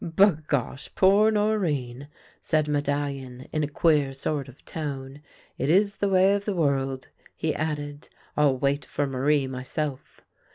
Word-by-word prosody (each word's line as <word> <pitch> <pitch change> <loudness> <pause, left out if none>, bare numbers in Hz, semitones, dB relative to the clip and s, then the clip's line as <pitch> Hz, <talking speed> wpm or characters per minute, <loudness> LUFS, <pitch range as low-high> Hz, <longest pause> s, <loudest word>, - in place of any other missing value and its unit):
" - - -8
Bagosh! 155 - +1
poor 200 +3 +5
Norinne," 155 - 0 0.3
said 155 -1 +1
Medallion, 140 -3 -2
in 155 -1 +1
a - - 0
queer 145 -2 +2
sort 140 +1 -2
of 130 - -17
tone. 140 -3 -5 0.2
" - - -31
It 140 - 0
is 200 +4 +3
the 200 - 0
way 190 +1 +5
of 200 0 -1
the 205 - -1
world," 135 -4 0 0.3
he 160 - -1
added. 145 -2 -4
" - - -32
I'll 145 -3 +3
wait 140 +2 0
for 145 - -2
]SIarie 135 +1 +1
myself." 130 +2 -5
145 Hz, 160 wpm, -26 LUFS, 135-165 Hz, 0.3 s, poor